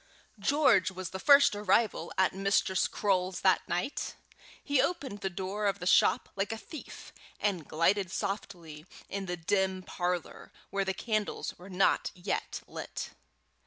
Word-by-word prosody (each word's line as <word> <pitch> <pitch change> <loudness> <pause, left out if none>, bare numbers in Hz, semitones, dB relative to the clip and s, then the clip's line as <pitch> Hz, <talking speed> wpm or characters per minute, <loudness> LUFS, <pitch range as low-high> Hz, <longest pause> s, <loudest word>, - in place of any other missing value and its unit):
George 275 -3 +4
was 185 -1 -6
the 190 - -5
first 280 +3 +6
arrival 205 -3 +1
at 190 0 +3
Mistress 195 -1 +2
Croale's 185 -2 0
that 190 -1 +4
night. 180 +11 -2 0.5
He 285 -2 +3
opened 275 - -2
the 195 - -1
door 190 +3 -2
of 200 -1 +1
the 180 - -7
shop - - +4
like 195 +2 -1
a 225 - -3
thief, 290 +8 -10 0.3
and 185 -7 -1
glided 180 +4 +2
softly 175 -5 -5 0.2
into 195 -2 -3
the - - -4
dim 190 +2 0
parlour, 180 -2 -3 0.2
where 195 0 0
the 190 0 -1
candles 215 -3 -2
were 180 +2 -11
not 190 +1 +2
yet 180 +2 -3
lit. - - -6
190 Hz, 150 wpm, -30 LUFS, 180-205 Hz, 0.5 s, first